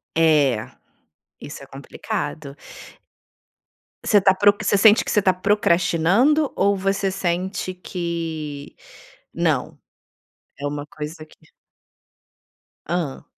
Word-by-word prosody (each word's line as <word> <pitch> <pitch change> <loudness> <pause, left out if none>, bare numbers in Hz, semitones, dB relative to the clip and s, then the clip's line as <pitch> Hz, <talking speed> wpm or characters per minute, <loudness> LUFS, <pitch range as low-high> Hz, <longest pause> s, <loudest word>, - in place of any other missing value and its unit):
É, 150 -8 +2 0.7
isso - - -9
é - - -11
complicado. 140 -2 -6 1.5
Você 210 - +4
tá 190 0 +4
pro 205 +2 +5
você 205 -1 +1
sente 210 +2 +5
que - - -3
você 210 - +3
tá 185 -1 +3
procrastinando 200 - +2
ou 200 0 +2
você 195 0 -1
sente 185 +1 -2
que 165 -5 -5 0.6
não? - - -1 0.8
É 145 - -3
uma 145 0 -5
coisa 155 +1 -8
que 155 - -22 1.5
Hã. 170 -6 -3
175 Hz, 105 wpm, -22 LUFS, 155-195 Hz, 1.5 s, pro